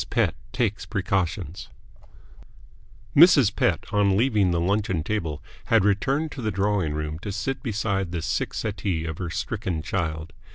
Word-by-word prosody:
PETT - - +2 0.2
TAKES 105 -4 -1
PRECAUTIONS 95 -3 -2 1.5
Mrs. 140 - +7
Pett, 85 -1 +1
on 100 -2 +3
leaving 110 -5 +3
the 85 -1 +1
luncheon 95 -2 0
table, 80 -7 -3 0.2
had 110 -4 +3
returned 135 +10 +1
to 135 - -7
the 110 - -1
drawing 100 -6 0
room 75 0 -3
to 100 - -5
sit 130 +6 -3
beside 100 -5 -1
the 85 -2 -3
sick - - -2
settee 95 -6 -2
of 80 -2 -5
her 90 -2 -3
stricken 90 -2 -3
child. 80 -3 -3
100 Hz, 150 wpm, -25 LUFS, 85-110 Hz, 1.5 s, Mrs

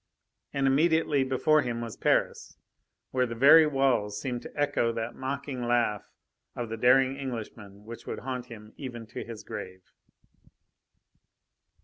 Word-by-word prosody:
And 140 -1 0
immediately 150 0 +3
before 150 +4 +3
him 120 -3 -3
was 115 -3 -6
Paris, - - 0 0.5
where 130 -1 +1
the 115 - -6
very 150 +6 +7
walls 125 -8 +1
seemed 125 0 -3
to - - -10
echo 130 -5 +1
that 115 0 -4
mocking 135 0 -4
laugh 120 -4 0 0.5
of 120 -2 -4
the 115 - -3
daring 130 +3 +4
Englishman 110 -6 -7
which 115 +1 -10
would - - -5
haunt 125 -1 -5
him 110 -2 -12
even 120 -5 -7
to 110 - -7
his 115 -2 -9
grave. 95 0 -9
125 Hz, 140 wpm, -28 LUFS, 115-135 Hz, 0.5 s, very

